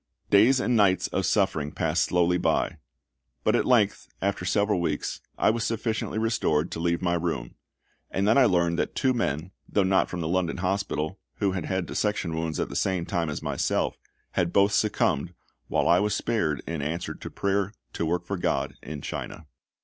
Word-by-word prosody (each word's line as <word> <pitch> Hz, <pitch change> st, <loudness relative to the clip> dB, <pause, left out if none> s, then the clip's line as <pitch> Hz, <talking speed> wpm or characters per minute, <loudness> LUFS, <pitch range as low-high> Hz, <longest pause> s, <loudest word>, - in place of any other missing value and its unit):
Days 115 Hz, +7 st, +6 dB
and 125 Hz, -1 st, +1 dB
nights 100 Hz, -4 st, +4 dB
of -, -, 0 dB
suffering 75 Hz, -1 st, +1 dB
passed 80 Hz, +1 st, +1 dB
slowly 90 Hz, 0 st, +2 dB
by; -, -, +1 dB, 0.7 s
but 110 Hz, -, +3 dB
at -, -, +2 dB
length, 110 Hz, -6 st, +3 dB
after 100 Hz, -2 st, -1 dB
several 100 Hz, 0 st, +2 dB
weeks, 75 Hz, -3 st, -2 dB, 0.2 s
I -, -, +4 dB
was 115 Hz, 0 st, -2 dB
sufficiently 110 Hz, -1 st, -2 dB
restored 100 Hz, -8 st, +1 dB
to -, -, -4 dB
leave 85 Hz, +1 st, 0 dB
my 85 Hz, -1 st, +2 dB
room; 80 Hz, -8 st, -2 dB, 0.6 s
and 100 Hz, +1 st, 0 dB
then 110 Hz, -, +5 dB
I 135 Hz, -, +6 dB
learned 85 Hz, -3 st, +2 dB
that -, -, -1 dB
two 130 Hz, -1 st, +2 dB
men, 90 Hz, -, -2 dB, 0.2 s
though 100 Hz, -, +2 dB
not 95 Hz, 0 st, +2 dB
from 90 Hz, -, -4 dB
the 80 Hz, -, -2 dB
London 90 Hz, 0 st, 0 dB
Hospital, 90 Hz, -2 st, -2 dB, 0.2 s
who 100 Hz, -2 st, +1 dB
had 90 Hz, -4 st, -3 dB
had 95 Hz, -2 st, -1 dB
dissection 105 Hz, -5 st, -1 dB
wounds 80 Hz, -1 st, -2 dB
at -, -, -1 dB
the -, -, -7 dB
same 95 Hz, -3 st, 0 dB
time 85 Hz, -4 st, -1 dB
as 75 Hz, -, -4 dB
myself, -, -, -1 dB, 0.3 s
had 85 Hz, -1 st, 0 dB
both 100 Hz, +2 st, +4 dB
succumbed, 90 Hz, -6 st, +1 dB, 0.3 s
while -, -, +1 dB
I 85 Hz, +1 st, +5 dB
was 105 Hz, 0 st, +1 dB
spared 85 Hz, -, 0 dB
in 80 Hz, -2 st, -3 dB
answer 80 Hz, +4 st, -3 dB
to -, -, -8 dB
prayer 100 Hz, 0 st, 0 dB, 0.2 s
to -, -, -2 dB
work 85 Hz, +2 st, -1 dB
for 100 Hz, +2 st, -3 dB
GOD 90 Hz, -, -1 dB
in 75 Hz, -2 st, -7 dB
China. 80 Hz, -, -6 dB
90 Hz, 190 wpm, -26 LUFS, 85-100 Hz, 0.7 s, Days